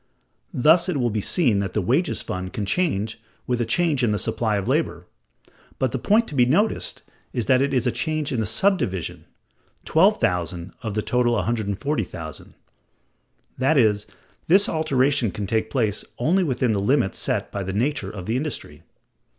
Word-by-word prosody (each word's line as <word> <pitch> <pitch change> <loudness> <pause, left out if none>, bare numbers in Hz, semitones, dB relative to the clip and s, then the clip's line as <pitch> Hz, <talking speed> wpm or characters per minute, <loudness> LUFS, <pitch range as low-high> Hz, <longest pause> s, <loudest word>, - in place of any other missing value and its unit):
Thus 165 +7 +4
it 170 - 0
will 120 -3 +1
be 105 0 -1
seen 120 - +2
that 95 -2 -3
the - - +2
wages 140 - +1
fund 95 0 -5
can 105 - -2
change 110 - -1 0.3
with 125 -1 -1
a 115 - -1
change 150 0 +1
in 120 - +3
the 105 - +1
supply 110 0 -1
of 100 +1 -3
labor: 130 - 0 0.7
but 130 -3 0
the 130 - -2
point 220 - +3
to - - -9
be 130 -3 +4
noticed 200 - 0 0.3
is 120 - -1
that 130 0 +4
it 140 0 +1
is 130 -2 +1
a 125 - +2
change 155 +1 -2
in 125 - -1
the 110 - -1
subdivision, 100 - 0 0.6
$12,000, 90 - +1
of 110 -4 -4
the 105 - 0
total 125 -1 +1
$140,000. 105 - -3 1.0
That 135 +4 +3
is, 105 -4 +3 0.4
this 195 +5 +5
alteration 140 -5 +1
can 100 +2 -4
take 110 +2 -1
place 110 -6 -1
only 175 +10 +2
within 130 -6 0
the 100 - 0
limits 100 0 +1
set - - -1
by 100 - -3
the 95 0 -3
nature 115 0 -1
of 95 -3 -7
the 110 - -1
industry. 150 +2 -5
120 Hz, 175 wpm, -23 LUFS, 100-150 Hz, 1.0 s, this